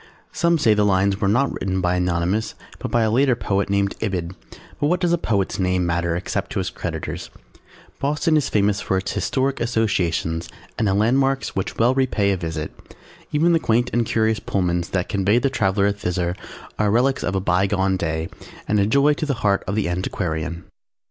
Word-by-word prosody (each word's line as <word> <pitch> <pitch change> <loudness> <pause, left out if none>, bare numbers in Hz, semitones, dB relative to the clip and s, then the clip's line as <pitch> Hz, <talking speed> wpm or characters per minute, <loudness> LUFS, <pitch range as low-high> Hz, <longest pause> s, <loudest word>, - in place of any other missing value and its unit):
"_ - - -20
Some 170 +1 +3
say 115 -8 +4
the 105 0 +2
lines 100 +1 +2
were 100 - +2
not 120 +8 +2
written 95 0 -2
by 90 -1 +1
Anonymous 90 +4 0 0.2
but - - -4
by 120 -1 +2
a 110 - +1
later 130 +2 +3
poet 100 -3 -1
named 100 0 +1
Ibid, 95 -5 -2 0.5
but 145 - +2
what 180 +3 +1
does 175 -1 +1
a - - +3
poet's 100 - -1
name 90 -1 +1
matter 85 0 0
except 95 +3 -3
to - - -3
his 90 - -2
creditors? - - -5 0.7
Boston 150 +3 +1
is 150 -3 +1
famous 105 0 +1
for 95 - 0
its 95 +1 -2
historic 135 0 -1
associations 90 -8 0 0.3
and 110 - +2
landmarks 135 +5 +1
which 95 -1 -3
well 120 +3 +4
repay 125 -7 +1
a - - +1
visit. 80 -3 -4 0.6
Even 165 +4 +3
the 165 - +4
quaint 120 -2 +1
and 120 - +2
curious 110 -1 +1
Pullmans 90 -3 -1
that 90 -1 -1
convey 100 +2 +2
the 130 +2 +1
traveller 100 -4 +2
thither 90 -3 -2 0.4
are 105 -1 +2
relics 125 +5 +2
of 95 - -1
a - - +2
bygone 95 +1 +1
day 80 -2 -2 0.4
and 105 - +2
a 100 - +2
joy 140 +6 +4
to 155 +1 -3
the 140 - 0
heart 100 -1 +2
of 95 - -1
the 105 -4 0
antiquarian. 85 -2 -3
100 Hz, 195 wpm, -22 LUFS, 90-120 Hz, 0.7 s, say